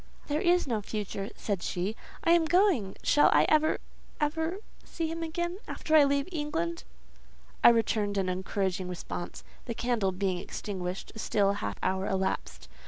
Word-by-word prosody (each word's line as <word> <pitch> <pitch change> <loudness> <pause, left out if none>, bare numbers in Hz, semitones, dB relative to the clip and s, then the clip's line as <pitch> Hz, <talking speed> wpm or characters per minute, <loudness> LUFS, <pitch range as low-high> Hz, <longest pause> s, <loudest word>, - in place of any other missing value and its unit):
"There 300 +2 -1
is 355 0 +3
no 230 -5 -1
future," 200 -1 -4
said 200 -4 -2
she: 185 +6 -2 0.3
"I 335 - +4
am 340 -1 +5
going. 330 - +3
Shall 295 - +5
I - - +5
ever—ever—see 320 +3 -2
him 330 +1 -4
again, 345 +3 -3
after 315 - 0
I 300 -2 +8
leave 280 +1 +1
England?" 170 - -2 0.8
I - - +11
returned 215 -3 +1
an 190 -1 +1
encouraging 185 0 -1
response. 175 0 -6 0.2
The 235 - -4
candle 235 -5 +1
being 185 -1 -1
extinguished, 185 -1 -5
a 220 - -9
still 200 -2 +2
half 105 - -4
hour 190 +1 0
elapsed. 190 - -2
215 Hz, 150 wpm, -29 LUFS, 190-315 Hz, 0.8 s, I